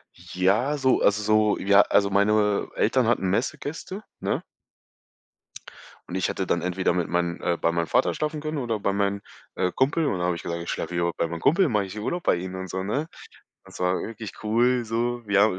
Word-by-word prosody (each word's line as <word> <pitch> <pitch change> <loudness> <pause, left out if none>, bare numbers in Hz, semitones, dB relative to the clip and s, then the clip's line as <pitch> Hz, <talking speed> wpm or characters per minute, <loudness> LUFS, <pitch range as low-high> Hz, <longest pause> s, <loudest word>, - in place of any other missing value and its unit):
Ja, 105 +11 0
so 130 -2 +2
also, 105 +1 +3
so 110 0 +3
w - - -6
ja, 100 0 +7
also, 100 0 +2
meine 105 +1 +2
Eltern - - +2
hatten 95 - +1
Messegäste, 145 - -3 0.2
ne? - - -2 1.7
Und 90 - -5
ich 95 - +1
hatte - - -2
dann - - 0
entweder 90 +1 0
mit 90 -2 -1
meinen 85 0 -1
äh, 85 - 0
bei 85 - +2
meinem 85 -1 -1
Vater - - +2
schlafen 155 0 -3
können 155 0 -3
oder 120 -5 -1
bei 100 - 0
meinem, 100 0 0 0.3
äh, 90 -1 0
Kumpel 145 +5 +1
und 100 - 0
dann - - -1
habe 90 -1 +1
ich 85 - -8
gesagt, 85 0 -3
ich 85 - -7
schlafe - - -3
hier 85 0 +1
bei - - 0
mein 85 0 -5
Kumpel 170 - +3
mache 105 -4 +1
ich 95 +3 -9
Urlaub 170 +12 -3
bei - - +3
ihm 90 +1 -5
und 95 0 -6
so, 95 +2 -3
ne? 135 +11 -2 0.6
Das - - -13
war 90 0 +1
wirklich 110 -2 -7
cool 120 +3 +2
so. 120 +2 -1
Wir 100 -1 +3
habe 105 -3 +2
100 Hz, 215 wpm, -25 LUFS, 90-120 Hz, 1.7 s, ja